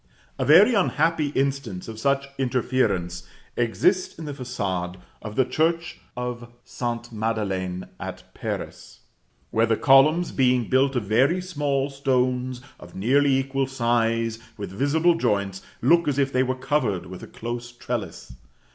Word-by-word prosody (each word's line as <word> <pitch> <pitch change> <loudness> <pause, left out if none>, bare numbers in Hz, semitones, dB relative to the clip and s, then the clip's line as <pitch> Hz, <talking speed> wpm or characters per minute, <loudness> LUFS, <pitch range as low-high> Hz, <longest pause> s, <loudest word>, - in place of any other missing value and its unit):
A - - 0
very 185 - +7
unhappy 165 -6 +2
instance 135 -9 -1
of 110 -1 -7
such 140 +2 +1
interference 125 -9 0 0.3
exists 180 - +1
in 160 - -7
the 145 - -5
façade 100 -9 -3 0.3
of 105 -1 -7
the 130 - +3
church 165 +4 0 0.2
of 120 -1 -5
St. 120 -1 -4
Madeleine 100 -5 -2
at - - -7
Paris, - - -6 0.5
where 115 +1 +2
the 115 -1 +2
columns, 150 +6 +5
being 125 -3 +2
built 135 +1 +3
of 120 - 0
very 130 - +3
small 145 -6 -1
stones 130 -2 0 0.2
of 85 0 -13
nearly 135 +7 +3
equal 135 0 -1
size, 115 -3 0 0.2
with 100 -3 -6
visible 150 - +2
joints, 100 - -1 0.2
look 170 +5 +4
as 145 -2 0
if 140 -1 +1
they 130 - +3
were 130 0 0
covered 130 -8 -1
with 90 +1 -9
a - - -9
close 120 +1 -6
trellis. 120 - -5
130 Hz, 145 wpm, -24 LUFS, 115-140 Hz, 0.5 s, very